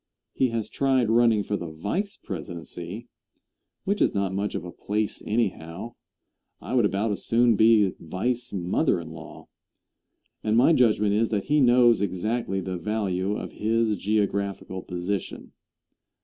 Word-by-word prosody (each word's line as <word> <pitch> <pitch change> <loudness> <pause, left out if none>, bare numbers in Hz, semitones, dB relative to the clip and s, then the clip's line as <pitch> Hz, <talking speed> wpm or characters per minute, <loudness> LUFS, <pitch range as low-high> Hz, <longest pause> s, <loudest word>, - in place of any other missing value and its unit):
He 130 - +2
has 115 -2 -2
tried 130 -4 +1
running 115 -2 +4
for 105 - -2
the 85 - -4
vice 165 - -3
presidency, 85 +4 -7 0.8
which 200 +1 -1
is - - +2
not 100 -1 0
much 100 +1 -2
of 85 - -4
a 90 - -7
place 105 +3 -2
anyhow 100 -2 -2 0.7
I - - -7
would 120 -4 +4
about 105 +2 0
as 100 - -4
soon 120 0 +3
be 110 -2 +5
vice 120 +9 -2
mother 95 - +1
in 80 -1 -8
law 80 -1 -11 1.0
and 110 +1 +2
my 130 +7 +6
judgment 105 -6 +3
is 110 +2 +2
that 105 -3 -1
he 150 +1 +2
knows 120 -3 +5
exactly 100 +1 -1
the 95 -1 -4
value 100 0 -1
of - - -6
his 110 0 +1
geographical 100 -2 -1
position. 90 +2 -4
105 Hz, 150 wpm, -25 LUFS, 95-115 Hz, 1.0 s, my